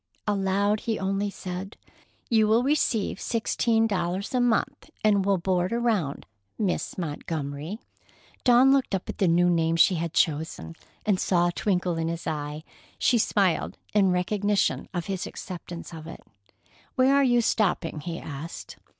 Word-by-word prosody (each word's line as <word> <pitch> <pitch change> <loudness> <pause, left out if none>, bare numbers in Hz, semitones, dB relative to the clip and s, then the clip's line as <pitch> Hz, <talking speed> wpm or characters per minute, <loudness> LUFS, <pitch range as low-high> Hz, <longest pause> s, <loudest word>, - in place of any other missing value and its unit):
Aloud, 200 +1 +1
he 225 -1 -2
only 195 +1 -1
said: 190 +1 -7 0.5
"You 220 -2 +3
will 225 +3 +4
receive 255 -8 0
sixteen 225 -1 +1
dollars 190 +2 -2
a 250 - +2
month, 245 +5 0
and 205 -2 +4
will 195 0 +2
board 180 +1 0
around, 225 -11 0 0.3
Miss 200 -5 -2
Montgomery." 155 +1 -4 0.7
Dawn 255 +2 +6
looked 270 -7 +1
up 190 - -4
at - - -6
the 190 - +3
new 175 +1 +4
name 165 -1 +2
she 165 +3 +5
had 170 -1 -4
chosen, 150 - 0 0.3
and 205 -4 +2
saw 175 -1 +2
a - - -2
twinkle 180 -2 0
in 165 0 -1
his 170 0 -4
eye. 150 0 -4 0.3
She 240 - +3
smiled 195 -5 +1 0.2
in 200 -2 +4
recognition 200 +3 0
of 175 -4 -3
his 190 -2 -3
acceptance 175 -1 -8
of 160 -1 -9
it. 165 - -9 0.7
"Where 260 +1 +4
are 280 0 +5
you 245 -2 +4
stopping?" 185 -8 0
he 165 +2 -5
asked. 150 +2 -8
190 Hz, 155 wpm, -26 LUFS, 170-215 Hz, 0.7 s, Dawn